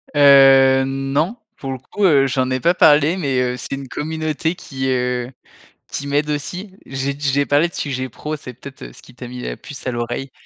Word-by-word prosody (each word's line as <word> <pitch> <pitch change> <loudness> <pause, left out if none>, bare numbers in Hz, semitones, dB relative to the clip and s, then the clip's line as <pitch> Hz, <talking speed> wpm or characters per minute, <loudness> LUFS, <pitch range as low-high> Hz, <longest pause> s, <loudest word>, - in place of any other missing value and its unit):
Heu, 135 -2 +7
non, 135 - -1 0.2
pour 135 -1 -5
le 130 - -4
coup, 200 +10 -5
heu, 140 -5 +5
j'en 130 0 0
ai 130 - 0
pas 170 +7 +3
parlé, 155 +1 +4
mais 135 -7 0
heu, 125 0 -1
c'est - - -8
une 135 -1 -8
communauté 160 +3 -3
qui, 130 -4 -5
heu, 125 0 -1 0.6
qui 140 - -4
m'aide 145 +1 0
aussi. 180 +7 -4
J'ai 135 +1 -3
d 140 - -14
j'ai 140 0 +1
parlé 145 +4 +3
de - - -15
sujet 130 -2 -3
pro. 155 +1 -5
C'est 125 -4 -9
peut-être, 130 +3 -12
heu, - - -10
ce - - -16
qui 125 - -17
t'a 125 0 -9
mis 125 0 -8
la - - -5
puce 140 -3 -11
à - - 0
l'oreille 120 +3 -4
135 Hz, 220 wpm, -19 LUFS, 130-150 Hz, 0.6 s, Heu